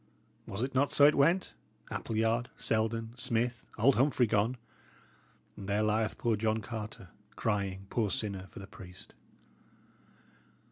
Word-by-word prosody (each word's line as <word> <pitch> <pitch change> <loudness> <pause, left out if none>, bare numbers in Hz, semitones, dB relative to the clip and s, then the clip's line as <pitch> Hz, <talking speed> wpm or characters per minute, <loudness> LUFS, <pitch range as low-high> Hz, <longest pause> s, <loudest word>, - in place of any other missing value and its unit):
Was 100 +4 -3
it 135 - -2
not 140 +2 +2
so 145 - +7
it 150 - +7
went? 170 +7 +3 0.4
Appleyard, 115 +2 0
Selden, 115 0 0
Smith, 120 -1 -1
old 125 +5 +4
Humphrey 130 -1 +4
gone; 110 +3 +1 1.0
and 100 0 -8
there 105 +2 +2
lieth 110 +1 +1
poor 115 -2 +1
John 110 +1 +1
Carter, 110 -4 -6 0.3
crying, 100 -3 -1
poor 110 -4 +1
sinner, 95 -1 -2
for - - -15
the 100 - -7
priest." 90 -2 -12
110 Hz, 135 wpm, -31 LUFS, 105-120 Hz, 1.0 s, so